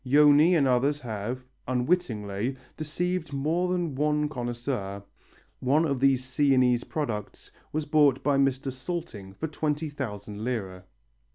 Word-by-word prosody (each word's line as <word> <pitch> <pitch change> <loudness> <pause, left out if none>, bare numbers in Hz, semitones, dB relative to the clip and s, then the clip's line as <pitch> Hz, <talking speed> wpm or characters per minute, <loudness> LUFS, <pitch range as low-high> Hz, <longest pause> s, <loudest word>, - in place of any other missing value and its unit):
Joni 150 +5 +6
and 140 -3 +3
others 135 +4 +2
have, 120 +1 -4 0.2
unwittingly, 125 - -1 0.2
deceived 165 +1 -2
more 165 +6 0
than 175 -4 -1
one 150 +2 +1
connoisseur. 120 -6 -4 0.6
One 145 +6 +3
of 140 -4 0
these 130 -1 +3
Sienese 130 -2 +3
products 115 -10 -4 0.2
was 155 0 -2
bought 145 -3 +3
by 145 -1 +3
Mr. 135 0 +1
Salting 130 - -5
for 160 - -4
twenty 150 0 -2
thousand 105 -6 -6
lire. 95 -7 -3
135 Hz, 125 wpm, -27 LUFS, 120-150 Hz, 0.6 s, Joni